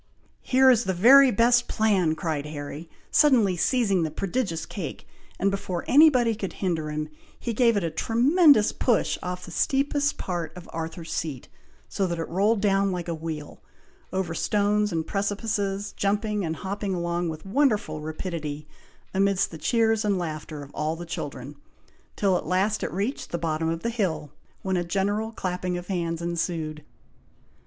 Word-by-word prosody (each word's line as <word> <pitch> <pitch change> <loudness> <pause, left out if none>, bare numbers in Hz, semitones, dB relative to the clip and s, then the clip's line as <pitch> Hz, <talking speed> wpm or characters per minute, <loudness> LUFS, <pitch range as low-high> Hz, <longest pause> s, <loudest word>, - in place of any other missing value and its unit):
"Here 260 0 +5
is 240 -1 +2
the 190 - -1
very 265 +8 +8
best 240 +2 +3
plan!" 195 -8 +2
cried 155 -3 -3
Harry, 150 +2 -7 0.2
suddenly 240 -11 +4
seizing 200 -1 +2
the 160 - 0
prodigious 185 +1 -2
cake; 175 -9 -6 0.3
and 200 +1 +1
before 185 -3 -3
any 310 +4 +8
body 240 -5 +2
could 205 -3 -5
hinder 165 -5 -2
him, 150 0 -3 0.3
he 235 - -3
gave 230 -1 +3
it 200 - 0
a 165 - -1
tremendous 250 - +4
push 240 -4 +1
off 180 0 -5
the 175 - -10
steepest 285 - +1
part 175 -2 -4
of 175 - -10
Arthur's 165 0 -5
Seat, 145 -6 -4 0.4
so 195 - -1
that 170 -1 -3
it 165 - -3
rolled 200 +4 +2
down 195 -1 +2
like 180 -1 -4
a 170 - -1
wheel, 160 -2 -6 0.5
over 185 -3 -2
stones 210 +3 +1
and 160 -1 -1
precipices, 205 0 -2
jumping 210 +1 0
and 160 -1 -2
hopping 195 +2 -3
along 170 0 -1
with 155 +1 -7
wonderful 205 - +1
rapidity, 155 -2 -5 0.5
amidst 195 0 +2
the 160 - -8
cheers 225 +4 +2
and 205 -2 +1
laughter 155 -3 -5
of 140 - -13
all 155 +1 -1
the 175 +1 -7
children, 145 -3 -6 0.6
till 195 -3 +2
at - - -6
last 195 +3 +1
it - - -3
reached 205 +9 -3
the 170 - -2
bottom 160 -1 -1
of 165 0 -3
the 235 - 0
hill, 185 -10 -2 0.3
when 190 -1 0
a 175 - 0
general 205 +5 -1
clapping 180 -3 -3
of 175 +1 -8
hands 170 -3 -2
ensued. 165 -3 -3
185 Hz, 170 wpm, -25 LUFS, 165-215 Hz, 0.6 s, very